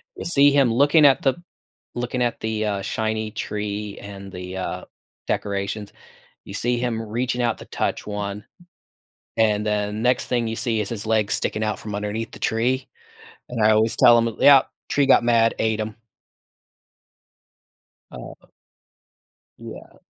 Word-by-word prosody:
you - - -7
see 145 -4 +5
him 135 -5 +3
looking 145 +5 +5
at 135 -2 +5
the 135 - +2 0.6
looking 125 +1 -2
at 120 -1 -1
the, 110 -1 -2
uh, 100 -2 -1
shiny 110 +2 -2
tree 105 -1 -4
and 100 -1 -9
the, 90 +1 -7
uh, 95 - -4 0.4
decorations; 100 +1 -3 0.5
you - - -10
see 120 0 0
him 120 -2 -2
reaching 120 +3 -2
out 120 - 0
to - - -10
touch - - -3
1, 105 0 -4 0.9
and 105 -1 +2
then 105 0 -1
next 125 +1 +2
thing 120 -2 0
you 110 - -3
see 115 -2 -1
is 100 - -4
his 110 -3 -5
legs 110 -2 +1
sticking 110 - -2
out 110 -1 -1
from 105 - -7
underneath 105 +2 -4
the - - -12
tree, 125 +4 0 0.6
and 115 -3 -1
I 110 - +6
always 110 +1 +2
tell 120 -1 +7
him, 115 -1 -1
"Yup, 140 -2 +6 0.2
tree 140 -1 +2
got 135 - +5
mad, 115 -1 +3
ate 110 -1 0
'em" 110 0 -5 2.1
Oh. - - -10 1.2
Yeah. - - -11
110 Hz, 155 wpm, -23 LUFS, 105-120 Hz, 2.1 s, tell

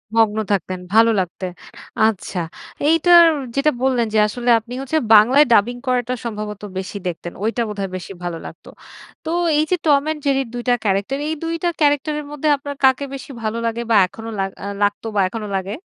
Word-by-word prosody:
মগ্ন 220 -1 +3
থাকতেন। 185 -1 -1
ভালো 230 +1 +6
লাগতে। 185 +1 -4 0.6
আচ্ছা। 195 -3 -3 0.5
এইটার 340 +1 +7 0.3
যেটা 300 +2 +3
বললেন 250 -3 +1
যে 220 - +2
আসলে 240 +3 -3
আপনি 240 +3 -11
হচ্ছে 275 +4 -1 0.2
বাংলায় 255 +8 +6
ডাবিং 225 +3 +3
করাটা 250 -1 0
সম্ভবত 210 -2 -5 0.2
বেশি 190 +2 -5
দেখতেন। 175 0 -5
ওইটা 230 +2 0
বোধহয় 200 -2 -4
বেশি 185 - -9
ভালো 175 -1 -3
লাগতো। - - -11 0.6
তো 315 - -3 0.3
এইযে 310 +4 +1
টম 285 -2 +5
অ্যান্ড 310 0 -2
জেরির 270 -2 +1
২ 240 - -5
টা 245 - +5
ক্যারাক্টার, 200 +6 0
এই 315 - -1
২ 330 0 -2
টা 350 - +3
ক্যারাক্টারের 295 +1 +1
মধ্যে 295 +1 -3
আপনার 285 0 -7
কাকে 265 +1 +4
বেশি 275 +1 -8
ভালো 220 +1 -2
লাগে 230 +1 -2
বা, 225 - +5
এখনো 225 +4 -9
লাগ 195 0 0
আ 200 - -4 0.2
লাগতো 205 +2 -1
বা, 200 - +3
এখনো 215 0 -5
লাগে? 195 +2 -3
230 Hz, 185 wpm, -20 LUFS, 205-280 Hz, 0.6 s, এইটার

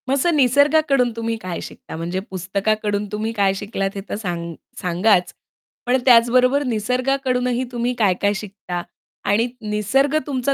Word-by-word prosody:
मग - - +2
असं 325 +4 +2
निसर्गाकडून 280 -1 +3
तुम्ही 230 0 -2
काय 180 -2 -5
शिकता, - - -9
म्हणजे 170 +3 -3
पुस्तकाकडून 205 +3 -1
तुम्ही 215 +1 -2
काय 200 -3 +2
शिकलात 195 -1 -2
हे 195 - -4
तर - - -2
सा 200 -4 -3 0.5
सांगाच, 180 +1 +2 0.5
पण 250 +1 +3
त्याचबरोबर 250 +3 +5
निसर्गाकडूनही 250 +1 0
तुम्ही 240 0 -1
काय-काय 200 -1 +2
शिकता 195 -3 -5 0.5
आणि 220 +4 +3 0.2
निसर्ग 255 +8 +1
तुमचा 275 -1 0
225 Hz, 135 wpm, -21 LUFS, 200-255 Hz, 0.5 s, त्याचबरोबर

